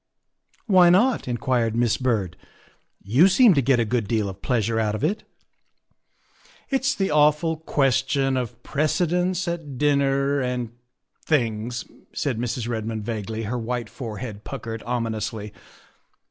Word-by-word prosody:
" - - -57 0.2
Why 185 -5 +6
not?" 225 - +3
inquired 120 -2 0
Miss 120 -1 +2
Byrd; 110 -9 -1 0.4
" - - -38
you 165 +8 +8
seem 210 +2 +6
to 140 - +3
get 130 -1 +3
a 115 - +2
good 115 -2 -1
deal 110 -2 0
of 95 0 -10
pleasure 115 -3 0
out 105 -1 0
of 110 - -5
it." 210 - -1 0.7
" - - -32
It's 270 +1 +1
the 195 -3 -1
awful 150 +2 +3
question 135 -2 +1
of 125 -4 -4
precedence 180 +4 0
at 165 -6 -4
dinner 140 -1 +2
and 125 -3 -2 0.5
things, 120 -4 -1
' - - -25
' - - -37
said 130 -6 -2
Mrs. 120 -1 -3
Redmond 110 -2 -3
vaguely, 110 0 -4
her 120 +3 -3
white 120 -1 -4
forehead 110 -3 -7
puckered 115 -4 -6
ominously. 110 -3 -3
125 Hz, 150 wpm, -24 LUFS, 115-150 Hz, 0.7 s, you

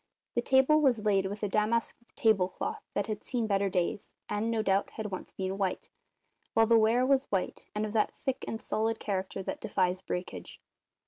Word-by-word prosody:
The 240 - +1
table 265 +5 +4
was 240 -7 +2
laid 195 -2 +3
with 205 +2 -6
a - - +2
damask 215 +3 +1 0.2
table 215 -8 +3
cloth - - -4
that 200 - +1
had 215 -1 -4
seen 240 -3 -1
better 200 -2 +1
days, 180 +2 -2
and, 210 +2 -1
no 225 -1 +1
doubt, 195 -1 +2
had 215 -2 -5
once 185 - -6
been 190 +1 -3
white, 190 -2 -2 0.6
while 225 - +6
the 230 +1 +4
ware 230 +3 +4
was 275 0 +3
white 190 -2 -2
and 210 +1 0
of 210 - -5
that 215 -2 +1
thick 265 -2 -2
and 225 - -3
solid 225 0 -1
character 195 -1 -3
that - - -4
defies 185 -1 0
breakage. 180 -1 -5
210 Hz, 195 wpm, -30 LUFS, 195-230 Hz, 0.6 s, while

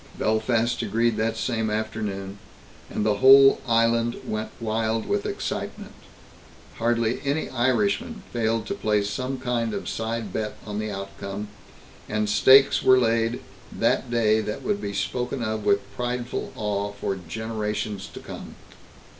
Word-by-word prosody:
Belfast 110 +2 +1
agreed 115 +2 +1
that 110 +1 0
same 115 -2 -1
afternoon, 105 -2 -3 0.5
and 105 - -2
the 105 -2 +2
whole 135 +3 +8
island 115 0 +2
went 110 0 -3
wild 110 0 -1
with - - -1
excitement. - - -4 0.9
Hardly 115 0 +1
any 145 +3 -1
Irishman 200 - 0
failed 115 -1 0
to - - -3
place 105 - 0
some 130 +5 -3
kind 120 -3 -1
of - - -5
side 115 -3 -3
bet 110 -1 -3
on 105 -1 -4
the 110 0 -3
outcome, 100 +1 -6 0.6
and 105 0 0
stakes 135 +6 +6
were 130 0 +6
laid 115 -1 +1 0.3
that 130 - +1
day 110 -2 +3
that 105 0 -5
would 205 -1 -1
be 100 - -3
spoken 125 +4 -2
of 110 -1 -2
with 100 0 +4
prideful 125 0 -3
awe 100 -1 -2
for 100 -1 -3
generations 105 -1 -3
to - - -9
come. - - -9
115 Hz, 140 wpm, -25 LUFS, 105-120 Hz, 0.9 s, whole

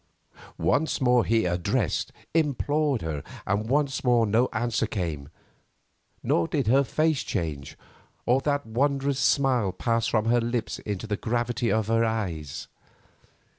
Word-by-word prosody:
Once 155 +3 +1
more 125 -3 +4
he 115 -2 +2
addressed—implored 145 - 0
her, 80 -3 -3 0.2
and 105 +3 -1
once 140 0 +1
more 120 -3 +4
no 115 +4 +2
answer 115 -1 0
came; 80 -9 -4 0.9
nor 85 - +2
did 140 -4 -1
her 135 +6 +4
face 155 +2 +1
change, 80 -8 -4 0.5
or 125 +3 +3
that 145 -2 0
wondrous 135 +4 0
smile 125 -7 +2
pass 115 +3 0
from 110 -1 +1
her 120 +1 +3
lips 115 -1 -2
into 105 0 -4
the 105 -1 -1
gravity 120 +1 -1
of 110 -1 +1
her 115 +2 +2
eyes. 95 -10 -3
115 Hz, 135 wpm, -26 LUFS, 105-135 Hz, 0.9 s, more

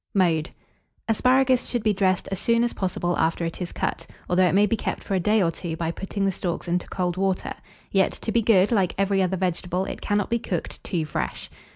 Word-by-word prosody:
] - - -54
Mode. 160 -2 0 0.6
Asparagus 255 +3 +3
should 240 -3 -2
be 215 -1 +3
dressed 185 -2 +1
as 195 - -2
soon 230 +2 +2
as 240 - 0
possible 175 -2 -1
after 165 +1 +1
it 165 +2 -5
is 175 - -3
cut, - - -3 0.2
although 180 +1 +4
it 180 - +1
may 205 +1 +6
be 210 - +1
kept - - -3
for - - -4
a 190 - +2
day 210 +3 +3
or 165 - +2
two 165 -1 -5
by 165 0 -1
putting 195 +3 -3
the 195 - +2
stalks 175 -1 -4
into 175 +1 -1
cold 180 -1 -2
water; 190 -1 0 0.4
yet, 195 -1 +3
to 220 - -4
be 230 - +3
good, 205 -2 +4
like 195 -6 +2
every 195 0 +2
other 190 0 0
vegetable, 180 0 -1
it - - -6
cannot 205 +1 0
be 235 - +2
cooked 180 -7 -4
too 165 -4 -1
fresh. 150 - -4
190 Hz, 230 wpm, -24 LUFS, 175-210 Hz, 0.6 s, may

